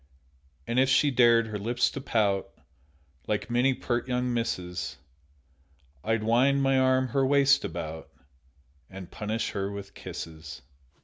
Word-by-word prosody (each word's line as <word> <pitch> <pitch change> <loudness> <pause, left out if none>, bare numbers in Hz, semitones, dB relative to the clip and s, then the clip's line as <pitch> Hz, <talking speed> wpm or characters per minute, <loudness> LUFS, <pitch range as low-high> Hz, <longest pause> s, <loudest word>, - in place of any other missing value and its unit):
And 120 +2 0
if 130 0 +3
she 140 +2 +4
dared 120 -2 +5
her 110 -2 -5
lips 120 +4 0
to 140 - -6
pout, 105 -7 0 0.8
Like 105 +3 -2
many 125 +2 +2
pert 120 0 -2
young 125 -1 -1
misses, 90 -9 -3 1.1
I'd 115 -1 0
wind 130 +5 +3
my 135 -1 +3
arm 130 0 +2
her 135 +3 +1
waist 140 0 +4
about 80 -1 -6 0.8
And 95 -2 -10
punish 110 +2 -3
her 100 0 -3
with 100 -1 -8
kisses. 80 -5 -9
115 Hz, 135 wpm, -27 LUFS, 100-130 Hz, 1.1 s, dared